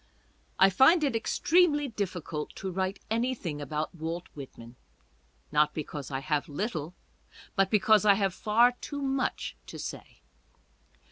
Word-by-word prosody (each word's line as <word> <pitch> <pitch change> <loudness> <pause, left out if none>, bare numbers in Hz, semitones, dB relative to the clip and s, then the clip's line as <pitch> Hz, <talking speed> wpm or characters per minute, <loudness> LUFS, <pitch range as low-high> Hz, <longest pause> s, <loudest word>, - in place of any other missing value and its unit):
I 195 0 +6
find 305 - +5
it 275 -5 +1
extremely 295 +5 +2
difficult 180 - -4
to 190 - -5
write 190 +2 -2
anything 225 - -1
about 150 +4 -3
Walt 165 +1 -5
Whitman: 125 -4 -11 0.8
not 150 0 +2
because 145 -3 -5
I 135 -1 -3
have 150 0 -1
little, 165 0 -4 0.6
but 195 -1 +3
because 215 0 +4
I 205 -2 +6
have 195 -2 0
far 230 +5 +4
too 285 +3 -7
much 270 -1 -2
to - - -8
say. - - -8
190 Hz, 135 wpm, -29 LUFS, 155-240 Hz, 0.8 s, I